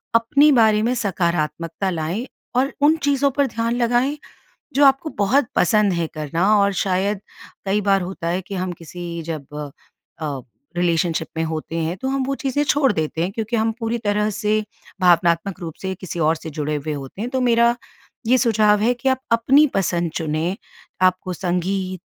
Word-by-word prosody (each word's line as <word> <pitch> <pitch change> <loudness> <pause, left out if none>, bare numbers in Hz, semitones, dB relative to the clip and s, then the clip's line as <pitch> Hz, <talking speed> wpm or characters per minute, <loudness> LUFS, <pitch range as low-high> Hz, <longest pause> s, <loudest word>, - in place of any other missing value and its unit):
अपने 280 +6 +5
बारे 220 -5 +4
में 245 +2 +1
सकारात्मकता 170 -3 -1
लाएँ 175 +7 -2 0.3
और 265 +2 +1
उन 305 +2 +5
चीज़ों 280 -1 +2
पर 280 0 +1
ध्यान 230 0 -1
लगाएँ, 245 +4 +1 0.6
जो 285 +1 +5
आपको 275 +3 +3
बहुत 245 +7 +3
पसंद 205 0 +3
है 170 -1 -1
करना 155 +5 -1
और 200 0 +3
शायद 190 +2 0 0.5
कई 200 +2 +1
बार 195 -1 +2
होता 180 -2 -5
है 180 +2 -1
कि 195 +2 -7
हम 185 0 -2
किसी 170 0 -6
जब 150 -1 -7 0.5
अ, 145 -3 -3 0.4
रिलेशनशिप 170 -2 +1
में 165 - +1
होते 160 0 -4
हैं, 165 +2 -1
तो 265 - -4
हम 270 0 0
वो 275 - -1
चीज़ें 275 +1 -1
छोड़ 280 -3 +3
देते 160 0 -2
हैं 180 +3 -1
क्योंकि 225 +2 -3
हम 225 0 +1
पूरी 230 +1 -1
तरह 210 0 0
से 215 +2 0 0.4
भावनात्मक 175 +1 +3
रूप 165 -3 -6
से 190 0 -2
किसी 175 -2 -7
और 160 +1 +3
से 160 - -8
जुड़े 150 0 -3
हुए 150 +1 -3
होते 140 +7 -7
हैं। 240 - -2
तो 260 -1 0
मेरा 235 -1 +4 0.5
ये 255 +2 +5
सुझाव 215 -4 +3
है 240 +3 +3
कि 265 +2 0
आप 260 0 +1
अपनी 265 +6 +5
पसंद 175 -3 0
चुनें, 160 +3 -1 0.5
आपको 185 0 +2
संगीत, 185 +1 -2
195 Hz, 180 wpm, -21 LUFS, 170-235 Hz, 0.6 s, अपने